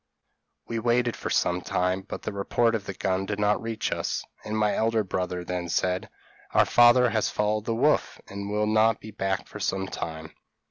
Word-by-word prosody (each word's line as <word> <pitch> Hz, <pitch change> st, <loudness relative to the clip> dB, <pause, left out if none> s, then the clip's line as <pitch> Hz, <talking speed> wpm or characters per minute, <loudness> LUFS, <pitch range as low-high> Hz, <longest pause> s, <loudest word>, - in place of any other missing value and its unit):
p> -, -, -6 dB
"We 115 Hz, -, 0 dB
waited 120 Hz, +1 st, +1 dB
for -, -, -5 dB
some 90 Hz, +1 st, +1 dB
time, 90 Hz, +2 st, 0 dB
but 95 Hz, -, -8 dB
the -, -, -4 dB
report 115 Hz, +4 st, +1 dB
of 110 Hz, -3 st, -2 dB
the 100 Hz, -, -5 dB
gun 95 Hz, 0 st, -1 dB
did 100 Hz, 0 st, -3 dB
not 105 Hz, 0 st, +2 dB
reach 115 Hz, -1 st, -3 dB
us, -, -, -2 dB, 0.2 s
and 110 Hz, 0 st, -3 dB
my 105 Hz, -1 st, +2 dB
elder 110 Hz, -1 st, +1 dB
brother 90 Hz, -2 st, -3 dB
then 90 Hz, -1 st, -3 dB
said, 90 Hz, +2 st, 0 dB, 0.5 s
'Our -, -, +6 dB
father 120 Hz, 0 st, +6 dB
has 110 Hz, -2 st, +1 dB
followed 105 Hz, 0 st, 0 dB
the 115 Hz, -, -1 dB
wolf, -, -, +2 dB
and 100 Hz, 0 st, -6 dB
will 105 Hz, +1 st, +1 dB
not 110 Hz, +1 st, +3 dB
be 110 Hz, -, -10 dB
back 95 Hz, -2 st, -2 dB
for -, -, -9 dB
some 95 Hz, 0 st, -1 dB
time. 80 Hz, -4 st, -6 dB
105 Hz, 200 wpm, -26 LUFS, 95-115 Hz, 0.5 s, Our